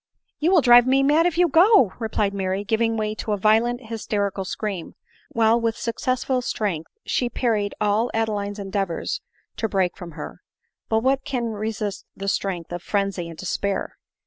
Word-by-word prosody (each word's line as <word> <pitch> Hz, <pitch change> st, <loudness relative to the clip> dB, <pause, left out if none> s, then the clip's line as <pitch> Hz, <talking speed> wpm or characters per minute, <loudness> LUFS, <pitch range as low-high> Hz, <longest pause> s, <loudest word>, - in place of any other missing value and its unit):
"You 315 Hz, -, +2 dB
will 365 Hz, -3 st, +5 dB
drive 245 Hz, -1 st, +7 dB
me 270 Hz, +1 st, +4 dB
mad 305 Hz, +5 st, +4 dB
if 340 Hz, -2 st, -2 dB
you 355 Hz, 0 st, +5 dB
go,'' 330 Hz, -, +5 dB
replied 215 Hz, -3 st, -1 dB
Mary, 190 Hz, 0 st, -1 dB
giving 225 Hz, +1 st, +1 dB
way 215 Hz, -1 st, -1 dB
to 215 Hz, 0 st, -3 dB
a -, -, 0 dB
violent 225 Hz, +4 st, +2 dB
hysterical 205 Hz, -3 st, -2 dB
scream, 190 Hz, -2 st, -4 dB, 0.3 s
while 230 Hz, +1 st, +3 dB
with 230 Hz, -1 st, 0 dB
suc 230 Hz, -1 st, -3 dB
cessful 255 Hz, 0 st, 0 dB
strength 190 Hz, -10 st, -2 dB, 0.2 s
she 245 Hz, -, 0 dB
parried 215 Hz, -5 st, 0 dB
all 210 Hz, +3 st, +2 dB
Adeline's 210 Hz, -2 st, -1 dB
endeavors 195 Hz, -3 st, -2 dB, 0.4 s
to 225 Hz, -, 0 dB
to -, -, -15 dB
break 190 Hz, -3 st, +1 dB
from 175 Hz, -3 st, -9 dB
her. -, -, -8 dB, 0.5 s
But 220 Hz, 0 st, +1 dB
what 270 Hz, +1 st, +2 dB
can 250 Hz, -5 st, -2 dB
resist 210 Hz, -1 st, -4 dB
the 195 Hz, -, -5 dB
strength 185 Hz, -4 st, -2 dB
of 175 Hz, 0 st, -4 dB
frenzy 195 Hz, -3 st, -1 dB
and 165 Hz, -, -10 dB
despair 195 Hz, +2 st, -3 dB
215 Hz, 175 wpm, -23 LUFS, 200-240 Hz, 0.5 s, drive